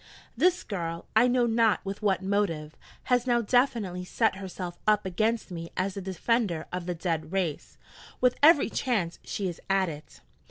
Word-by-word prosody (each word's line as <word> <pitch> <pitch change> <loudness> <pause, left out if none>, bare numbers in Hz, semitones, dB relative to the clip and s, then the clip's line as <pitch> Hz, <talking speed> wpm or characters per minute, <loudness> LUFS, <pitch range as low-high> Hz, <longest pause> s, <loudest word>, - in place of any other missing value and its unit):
(This 355 +8 +2
girl, 170 -4 -4
I 230 +3 +6
know 245 -1 +3
not 225 -3 +2
with 195 +2 -5
what 195 -3 +1
motive, 180 -6 -1 0.3
has 250 0 +1
now 240 -1 +3
definitely 225 -6 +1
set 180 - 0
herself 185 -2 -6
up 210 -1 +3
against 215 +4 -1
me 165 -1 -6
as 190 +1 0
the 195 - -5
defender 190 -1 -1
of 180 -1 -4
the 180 - -2
dead 165 -2 -2
race. 185 -6 -2 0.4
With 250 -1 +3
every 295 -5 +6
chance 195 -10 -1
she 200 - -3
is 175 - -6
at 190 -2 +2
it.) 150 -2 -11
195 Hz, 170 wpm, -28 LUFS, 175-230 Hz, 0.4 s, I